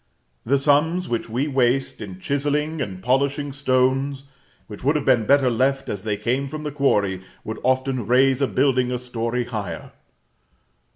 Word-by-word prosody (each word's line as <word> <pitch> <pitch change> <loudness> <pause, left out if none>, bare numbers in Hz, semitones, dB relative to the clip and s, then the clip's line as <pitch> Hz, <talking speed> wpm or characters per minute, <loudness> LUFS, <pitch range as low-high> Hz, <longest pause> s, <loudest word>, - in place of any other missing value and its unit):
The 140 +3 +4
sums 150 +6 +2
which 115 -1 -3
we 125 +6 -1
waste 135 -2 +1
in 95 -3 -8
chiselling 145 +5 -1
and 95 -6 -5
polishing 140 +3 0
stones 135 0 +1 0.4
which 105 -2 -11
would 145 +4 +2
have 150 - -1
been 120 -5 +3
better 135 -2 +4
left 135 +3 0
as 100 - -3
they 105 0 -2
came 130 +5 -1
from 150 +2 -6
the 150 - -3
quarry 105 -10 +1 0.2
would 110 - -6
often 130 -2 0
raise 130 +2 +3
a 135 - +3
building 130 -2 +1
a 125 - -1
story 120 0 -3
higher. 110 -5 -6
130 Hz, 165 wpm, -22 LUFS, 120-140 Hz, 0.4 s, The